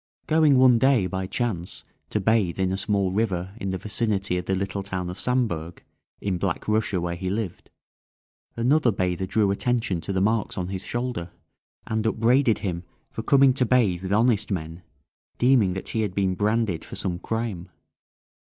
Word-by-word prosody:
Going 155 -3 +4
one 125 -2 +6
day, 130 -5 +4
by 95 +1 -3
chance, 95 -4 -3 0.3
to 105 - 0
bathe 100 -4 +1
in 95 -1 +1
a - - 0
small 100 -1 0
river 95 -3 -1
in 100 -4 -4
the 95 - -2
vicinity 105 -2 -1
of 90 - -7
the 95 - 0
little 100 +1 -3
town 95 -2 -4
of 90 - -9
Samburg, 95 -10 -1 0.4
in 95 -3 -2
Black 95 -3 -2
Russia, 105 -3 +1
where 85 0 -2
he 95 +1 -4
lived, 100 -3 -4 0.9
another 125 +2 +3
bather 95 -1 -1
drew 100 0 +2
attention 110 -4 0
to 100 - -5
the 95 - 0
marks 110 +2 0
on 90 -1 -3
his 95 0 -4
shoulder, 120 -8 -3 0.6
and 110 0 -1
upbraided 115 +2 +3
him 85 -2 -3 0.3
for - - -5
coming 135 +2 +5
to 130 - +1
bathe 110 -8 +2
with 95 0 -5
honest 110 0 +2
men, 85 -3 -4 0.6
deeming 120 -7 +4
that 95 - -5
he 110 - -1
had 100 -4 -2
been 95 -2 +1
branded 105 -2 0
for - - -9
some 85 -2 -3
crime. 110 -5 -4
100 Hz, 180 wpm, -25 LUFS, 95-115 Hz, 0.9 s, one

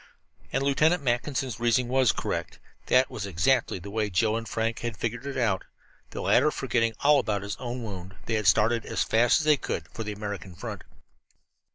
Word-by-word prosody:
And 135 - 0
Lieutenant 150 +4 +3
Mackinson's 125 -1 -1
reasoning 120 +1 +2
was 130 -2 +3
correct. - - -4 0.3
That 130 +1 +4
was 100 -2 -4
exactly 100 +7 +1
the 100 +3 -9
way 105 -1 -1
Joe 105 +4 +1
and 115 0 -4
Frank 115 0 -1
had 120 -5 -4
figured 120 +5 -3
it 140 - -4
out, 105 -7 +1
and, - - -21 0.4
the - - -6
latter 150 - +4
forgetting 115 -5 0
all 145 0 +5
about 105 -5 -1
his 100 - -4
own 125 0 -5
wound, 95 -3 -7
they 115 - -2
had 110 -3 0
started 115 +2 +4
as - - -1
fast 120 +7 +3
as - - -4
they 150 -1 +5
could - - -4
for 115 - -6
the 105 - -4
American 100 -3 -6
front. - - -6
115 Hz, 200 wpm, -27 LUFS, 105-130 Hz, 0.4 s, all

